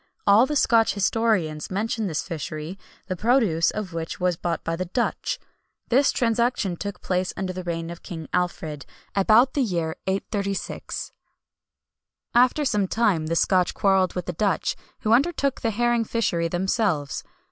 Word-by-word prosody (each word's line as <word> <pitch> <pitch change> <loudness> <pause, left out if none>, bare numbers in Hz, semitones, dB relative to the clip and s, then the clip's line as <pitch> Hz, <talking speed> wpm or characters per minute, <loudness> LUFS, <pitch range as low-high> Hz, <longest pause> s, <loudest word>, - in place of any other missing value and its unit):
All 210 +6 +6
the 300 - -2
Scotch 230 -6 +3
historians 195 -7 +1
mention 215 +2 -1
this 160 -4 -2
fishery, 155 +2 -6 0.3
the 185 - -3
produce 215 -6 +3
of 200 -5 -4
which 165 0 -4
was 180 -1 +1
bought 170 0 -3
by 165 - -1
the 185 +2 -3
Dutch. 235 +7 -1 0.5
This 270 +4 +4
transaction 235 -5 +1
took 200 +3 -6
place 185 0 -1
under 190 -1 -2
the 185 0 -5
reign 165 -1 -3
of 170 - -9
King 165 -5 -7
Alfred, 160 -6 -2 0.3
about 220 +6 +4
the 285 - +1
year 170 -9 -1
836. 195 +1 -3 1.2
After 255 +5 +4
some 205 -7 +1
time 190 -8 +1
the 165 - 0
Scotch 180 +1 +2
quarrelled 190 -2 +2
with 180 - -3
the 180 - -3
Dutch, 200 +3 0 0.3
who 220 - +2
undertook 280 +1 +2
the 230 - +1
herring 240 +1 +1
fishery 195 -7 0
themselves. 175 -4 0
195 Hz, 155 wpm, -24 LUFS, 170-230 Hz, 1.2 s, All